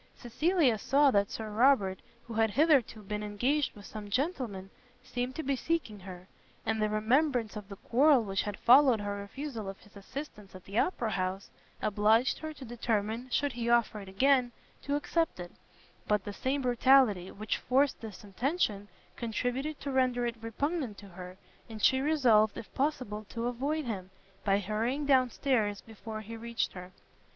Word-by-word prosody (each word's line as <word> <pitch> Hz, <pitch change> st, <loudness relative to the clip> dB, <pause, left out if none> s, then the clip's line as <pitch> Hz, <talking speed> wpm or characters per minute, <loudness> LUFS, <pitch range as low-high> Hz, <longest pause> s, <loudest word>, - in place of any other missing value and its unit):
Cecilia 270 Hz, -, +1 dB
saw 280 Hz, +5 st, +4 dB
that 200 Hz, -3 st, +2 dB
Sir 220 Hz, -1 st, -6 dB
Robert, 210 Hz, -5 st, +3 dB, 0.3 s
who 235 Hz, -, -8 dB
had 225 Hz, 0 st, +2 dB
hitherto 270 Hz, -5 st, +2 dB
been 210 Hz, +1 st, -4 dB
engaged 250 Hz, +8 st, 0 dB
with 205 Hz, -1 st, -12 dB
some 210 Hz, -1 st, -8 dB
gentlemen, 230 Hz, -, -2 dB, 0.3 s
seemed 250 Hz, +1 st, -4 dB
to 320 Hz, -, -4 dB
be 275 Hz, -1 st, 0 dB
seeking 265 Hz, -8 st, -2 dB
her; 185 Hz, -1 st, -10 dB, 0.4 s
and 220 Hz, -1 st, 0 dB
the 215 Hz, -, +2 dB
remembrance 235 Hz, +2 st, +1 dB
of 210 Hz, -1 st, -8 dB
the 200 Hz, -, -7 dB
quarrel 260 Hz, +5 st, +4 dB
which 195 Hz, -2 st, -1 dB
had 205 Hz, -1 st, -4 dB
followed 255 Hz, -1 st, +6 dB
her 205 Hz, 0 st, -3 dB
refusal 220 Hz, +1 st, -6 dB
of 195 Hz, -, -8 dB
his 205 Hz, -, -20 dB
assistance 210 Hz, -2 st, -9 dB
at 185 Hz, -, -11 dB
the 200 Hz, +4 st, -1 dB
Opera 240 Hz, -11 st, 0 dB
house, 185 Hz, 0 st, -3 dB, 0.3 s
obliged 215 Hz, +4 st, +3 dB
her 315 Hz, 0 st, -5 dB
to 285 Hz, -3 st, -10 dB
determine, 230 Hz, 0 st, -2 dB
should 285 Hz, +3 st, 0 dB
he 235 Hz, 0 st, -2 dB
offer 235 Hz, -3 st, +2 dB
it 195 Hz, -2 st, -9 dB
again, 255 Hz, +4 st, +3 dB, 0.3 s
to 285 Hz, -, -1 dB
accept 325 Hz, -, -1 dB
it: 175 Hz, 0 st, -7 dB, 0.6 s
but 210 Hz, -2 st, +1 dB
the 205 Hz, -, -6 dB
same 270 Hz, +5 st, -1 dB
brutality 245 Hz, -6 st, +4 dB
which 210 Hz, +1 st, -3 dB
forced 270 Hz, +2 st, +1 dB
this 215 Hz, -4 st, -9 dB
intention, 210 Hz, -, -1 dB, 0.3 s
contributed 245 Hz, +6 st, -3 dB
to 280 Hz, -, -3 dB
render 255 Hz, -2 st, +1 dB
it 235 Hz, -1 st, -4 dB
repugnant 255 Hz, -, -2 dB
to 200 Hz, 0 st, -12 dB
her, 180 Hz, 0 st, -10 dB, 0.3 s
and 220 Hz, -2 st, -8 dB
she 265 Hz, 0 st, +4 dB
resolved 245 Hz, -8 st, +3 dB
if 220 Hz, -, -9 dB
possible 255 Hz, -7 st, -2 dB
to 230 Hz, 0 st, -4 dB
avoid 275 Hz, +6 st, -1 dB
him, 190 Hz, -6 st, -4 dB, 0.3 s
by 195 Hz, -1 st, +3 dB
hurrying 225 Hz, +8 st, -1 dB
down 260 Hz, -3 st, +4 dB
stairs 220 Hz, -6 st, 0 dB
before 220 Hz, 0 st, -8 dB
he 225 Hz, +2 st, -8 dB
reached 235 Hz, +1 st, -3 dB
her. 180 Hz, 0 st, -9 dB
230 Hz, 175 wpm, -30 LUFS, 205-270 Hz, 0.6 s, followed